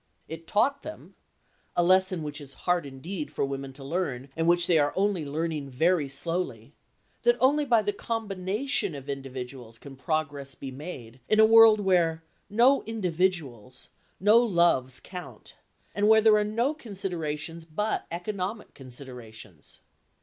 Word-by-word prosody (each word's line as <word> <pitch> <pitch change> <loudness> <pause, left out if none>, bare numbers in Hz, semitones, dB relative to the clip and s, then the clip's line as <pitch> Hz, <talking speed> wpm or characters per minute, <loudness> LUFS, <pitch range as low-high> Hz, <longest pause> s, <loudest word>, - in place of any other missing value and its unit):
It 165 +1 -9
taught 275 +7 +2
them 315 - -10 0.6
(a 175 - +4
lesson 185 -1 +3
which 150 0 -6
is 140 -1 -11
hard 175 -4 +1
indeed 150 +5 -6
for - - -1
women 135 0 -5
to 135 +1 -10
learn, 140 -4 -3
and 165 0 0
which 175 0 +4
they 170 -3 +3
are 145 0 +1
only 195 -3 +1
learning 155 -1 -3
very 155 +2 +1
slowly) 140 -6 -3 0.5
that 480 0 +3
only 290 +3 +3
by 235 -5 +3
the 205 0 -1
combination 205 - -2
of 140 -1 -9
individuals 130 -4 -7
can 140 +2 -12
progress 140 -2 -3
be 135 - -7
made 130 -4 -9
in 215 - +3
a 220 - +9
world 225 -1 +7
where 170 -5 +2 0.3
no 245 +6 +4
individuals, 175 - -2 0.3
no 210 +4 +6
loves 170 - +2
count, 180 -1 -10 0.4
and 205 +1 +1
where 220 0 +7
there 220 -1 +5
are 210 - +3
no 230 +7 0
considerations 170 - -5
but 210 +7 -2
economic 195 +4 -4
considerations. 120 - -10
170 Hz, 150 wpm, -27 LUFS, 140-205 Hz, 0.6 s, a